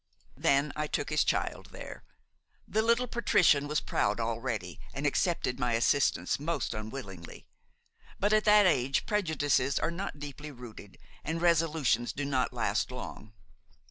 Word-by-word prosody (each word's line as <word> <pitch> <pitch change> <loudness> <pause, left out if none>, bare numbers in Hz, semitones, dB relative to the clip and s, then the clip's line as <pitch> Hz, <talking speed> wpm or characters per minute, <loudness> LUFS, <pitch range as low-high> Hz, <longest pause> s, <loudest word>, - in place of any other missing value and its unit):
Then 140 +2 +2
I 150 0 -2
took - - -2
his - - +3
child - - -1
there. - - -10 0.6
The 220 - +1
little 235 +2 +2
patrician 180 - +3
was 150 +1 +1
proud 105 +3 0
already 115 -6 -3 0.2
and 140 +2 -3
accepted 145 -3 0
my 125 -2 0
assistance 130 +6 +2
most 165 +4 -2
unwillingly; 110 -6 -8 0.7
but 205 +2 +2
at 215 0 +3
that 210 -1 +7
age 135 -6 +2
prejudices 145 -9 +1
are - - 0
not 180 -2 -5
deeply 145 +1 -7
rooted 120 -7 -11 0.3
and 165 +1 -2
resolutions 160 -8 +2
do 145 - -3
not 130 -2 0
last - - 0
long. 110 0 -8
145 Hz, 140 wpm, -30 LUFS, 120-170 Hz, 0.7 s, that